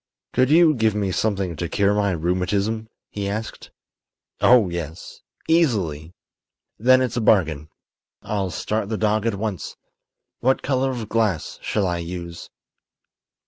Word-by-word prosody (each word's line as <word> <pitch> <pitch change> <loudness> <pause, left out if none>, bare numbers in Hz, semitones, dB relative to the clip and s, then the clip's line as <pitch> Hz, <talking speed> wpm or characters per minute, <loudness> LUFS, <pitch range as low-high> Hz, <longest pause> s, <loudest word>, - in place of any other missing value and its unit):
"Could 130 +1 +3
you 160 0 +6
give 110 -5 +1
me 100 -2 -1
something 95 -3 -1
to 85 +1 -3
cure 100 +3 +2
my 105 -1 +1
rheumatism?" 95 +6 -1 0.2
he 100 -1 -3
asked. 110 +3 -5 0.7
"Oh, 120 -5 +5
yes; 85 -1 -7 0.3
easily." 95 - +1 0.6
"Then 130 +3 +5
it's 125 -1 -2
a - - +1
bargain. 80 -9 +2 0.5
I'll 100 -3 -2
start 105 +6 -2
the 110 - -2
dog 110 +1 +1
at 115 - 0
once. 100 -2 -4 0.6
What 130 +2 +1
color 135 0 +1
of 120 -4 -4
glass 110 -8 -1
shall 105 -2 -1
I 90 -1 -1
use?" 85 0 -7
105 Hz, 140 wpm, -22 LUFS, 90-115 Hz, 0.7 s, you